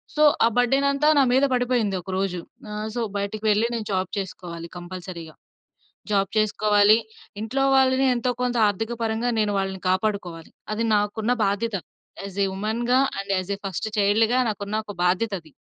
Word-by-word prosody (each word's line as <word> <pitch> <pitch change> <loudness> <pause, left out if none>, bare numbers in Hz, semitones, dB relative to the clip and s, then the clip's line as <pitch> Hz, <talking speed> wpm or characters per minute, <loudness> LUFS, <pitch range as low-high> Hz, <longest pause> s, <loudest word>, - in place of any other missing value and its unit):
So 305 - +3 0.2
ఆ - - +6
బర్డెనంతా 275 +4 +2
నా 275 - +6
మీద 265 +2 +4
పడిపోయింది 245 -5 +1
ఒక 180 - -12
రోజు. 185 -2 -1 0.3
ఆహ్, 210 +1 -4
సో 240 - -1 0.2
బయటికి 200 +2 -4
వెళ్లి 210 +2 +3
నేను 220 -2 -4
జాబ్ 185 -1 -1
చేసుకోవాలి 170 -3 -7
కంపల్సరీగా. 175 -2 -8 0.8
జాబ్ 195 -1 +2
చేసుకోవాలి 210 0 +4 0.4
ఇంట్లో 225 +5 -1
వాళ్ళని 265 0 +4
ఎంతో 245 +1 0
కొంత 245 -1 0
ఆర్థిక 220 +4 -2
పరంగా 225 +2 0
నేను 210 -1 +1
వాళ్ళని 190 -1 -3
కాపాడుకోవాలి. 185 -4 -2 0.2
అది 225 +2 -1
నాకున్న 210 +3 0
బాధ్యత 205 +2 -1 0.5
as 200 0 -8
a - - +1
ఉమెన్‌గా 235 +5 +1 0.2
and 195 0 -4
as 185 +1 -5
a - - -23
first 195 +3 -3
చైల్డ్‌గా 220 +4 +3
నాకున్న 205 0 -4
ఒక 205 - -8
బాధ్యతది. 185 -2 0
210 Hz, 155 wpm, -24 LUFS, 195-235 Hz, 0.8 s, ఆ